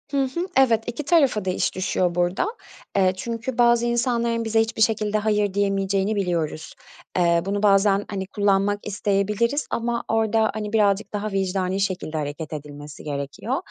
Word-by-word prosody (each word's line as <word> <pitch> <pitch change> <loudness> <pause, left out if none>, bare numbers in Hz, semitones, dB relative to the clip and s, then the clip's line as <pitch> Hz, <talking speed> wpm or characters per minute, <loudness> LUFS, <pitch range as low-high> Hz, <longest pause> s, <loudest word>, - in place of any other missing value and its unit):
Hı 280 -1 +2
hı. 340 +8 -3
Evet, 235 -4 +4
2 240 +5 -4
tarafa 275 - +3
da - - 0
iş 185 - -1
düşüyor 185 -1 0
burada. 175 - +1 0.5
Eee, 190 -2 +3
çünkü 235 +3 -4
bazı 240 -1 +4
insanların 235 -1 0
bize 225 0 +2
hiçbir 225 0 -3
şekilde 215 -1 +2
"hayır" 210 -2 +1
diyemeyeceğini 195 +1 0
biliyoruz. 170 -5 -2 0.4
Eee, 170 -1 +3
bunu 200 +1 -2
bazen, 200 0 +4
hani, 190 -2 -4
kullanmak 200 0 +1
isteyebiliriz 210 +6 0
ama 235 0 -1
orada, 220 0 +2
hani, 210 0 -5
birazcık 205 -1 +2
daha 210 +1 -3
vicdani 190 -1 -1
şekilde 185 -5 -2
hareket 150 +1 -4
edilmesi 145 0 -9
gerekiyor 145 - -3
205 Hz, 155 wpm, -23 LUFS, 185-225 Hz, 0.5 s, Evet